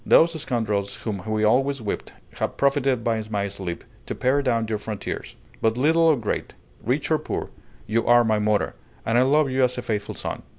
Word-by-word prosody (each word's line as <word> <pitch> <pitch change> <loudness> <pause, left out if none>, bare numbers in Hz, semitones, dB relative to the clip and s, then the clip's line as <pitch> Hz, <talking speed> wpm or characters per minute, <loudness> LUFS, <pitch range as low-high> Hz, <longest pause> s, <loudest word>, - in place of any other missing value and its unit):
Those 165 +1 +5
scoundrels 105 -6 -1
whom 105 -4 -3
we 110 0 0
always 135 +5 +3
whipped 105 -3 -4 0.3
have - - -2
profited 135 -3 +2
by 115 -1 0
my 100 -2 -1
sleep 95 -3 -6 0.2
to - - -3
pare 135 +3 +2
down 115 -4 +1
your 110 -1 -2
frontiers; 105 -1 -5 0.3
but 110 +1 +2
little 160 +6 +3
or 165 -2 +6
great, 110 -3 -3 0.3
rich 135 +7 -1
or 155 - +4
poor, 155 - -4 0.3
you 115 +2 0
are 120 0 +6
my 110 -2 +2
mother, 105 0 +1 0.3
and 115 - +1
I 120 - +6
love 140 +1 +3
you 130 0 +2
as 125 0 +1
a 125 - -3
faithful 105 -2 -3
son! - - -4
115 Hz, 200 wpm, -24 LUFS, 105-135 Hz, 0.3 s, or